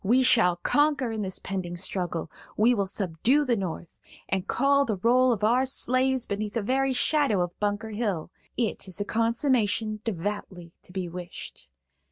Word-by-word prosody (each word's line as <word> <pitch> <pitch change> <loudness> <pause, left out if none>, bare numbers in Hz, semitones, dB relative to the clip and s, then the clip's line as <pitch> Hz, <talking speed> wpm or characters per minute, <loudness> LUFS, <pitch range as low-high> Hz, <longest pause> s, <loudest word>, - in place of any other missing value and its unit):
We 245 +6 +4
shall 220 -8 +4
conquer 285 - +1
in 220 -1 -3
this 190 -2 -2
pending 180 -2 -5
struggle; 175 -3 -3 0.3
we 230 +4 +4
will 200 -4 0
subdue 205 - +1
the 245 -3 +2
North, 175 -4 -6 0.3
and 190 0 -2
call 280 +2 +3
the 220 -7 -2
roll 250 +5 +4
of 215 -3 -2
our 245 +5 +3
slaves 255 0 +2
beneath 205 +1 -4
the 230 - 0
very 265 +4 +1
shadow 265 -4 +2
of 175 0 -7
Bunker 210 +2 -2
Hill. 205 -7 -2 0.3
'It 225 -4 -2
is 185 - -2
a 205 - -1
consummation 225 -2 0
devoutly 185 -3 -5
to - - -13
be 185 -1 -3
wished.' 175 - -9
215 Hz, 170 wpm, -26 LUFS, 185-250 Hz, 0.3 s, We